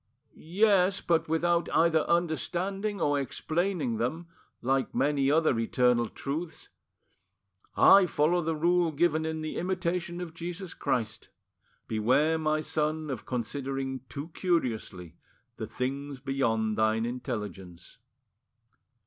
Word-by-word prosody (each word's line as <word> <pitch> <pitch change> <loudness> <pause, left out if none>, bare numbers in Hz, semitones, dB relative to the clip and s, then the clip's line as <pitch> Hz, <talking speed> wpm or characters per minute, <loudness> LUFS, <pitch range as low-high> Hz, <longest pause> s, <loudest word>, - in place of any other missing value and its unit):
"Yes, 195 +2 +2
but 165 -2 0
without 170 +1 +1
either 165 -1 +4
understanding 175 +5 -1
or 145 -1 +1
explaining 155 - -1
them, 150 +10 -2 0.4
like 135 +2 0
many 140 -1 +2
other 155 -5 +3
eternal 120 0 +2
truths. 160 +4 -5 1.1
I 195 -2 +7
follow 170 +3 +2
the 165 0 -1
rule 170 +1 +2
given 160 +1 +1
in 160 0 -3
the 155 - -4
Imitation 175 -1 -2
o - - -3
f 165 - -13
Jesus 175 +2 -6
Christ: 110 -3 -2 0.6
'Beware, 130 +9 +2
my 155 0 +1
son, 155 -1 -1
of 125 - -6
considering 130 +2 -3
too 145 +4 -6
curiously 115 - -2 0.4
the - - -5
things 135 +2 -4
beyond 110 -5 0
thine 110 +1 +2
intelligence. 105 -8 -6
155 Hz, 115 wpm, -28 LUFS, 125-170 Hz, 1.1 s, I